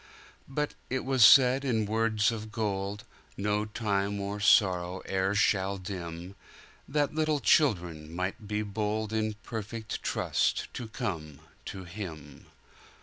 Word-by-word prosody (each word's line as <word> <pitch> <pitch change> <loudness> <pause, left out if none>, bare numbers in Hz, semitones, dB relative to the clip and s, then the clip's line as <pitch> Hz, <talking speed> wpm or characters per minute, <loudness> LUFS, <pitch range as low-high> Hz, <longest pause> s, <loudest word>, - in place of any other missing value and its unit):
But 150 +2 -2 0.2
it 130 0 -2
was 130 -3 +4
said, 130 +3 +7
in 115 -5 +1
words 110 0 +2
of 110 -1 -6
gold, 105 -2 -2 0.3
No 105 +1 0
time 100 -2 -1
or 100 +1 -4
sorrow 95 -3 +3
e'er 95 +1 0
shall 100 -1 +2
dim, 90 -1 -7 0.5
That 145 +1 0
little 155 -1 +1
children 90 - +2
might 95 +6 -4
be 105 0 -1
boldIn 110 +1 -2
perfect 110 0 -5
trust - - 0
to 120 - -5
come 80 - -5 0.3
to 95 - -6
Him. 85 -7 -8
105 Hz, 125 wpm, -29 LUFS, 95-115 Hz, 0.5 s, said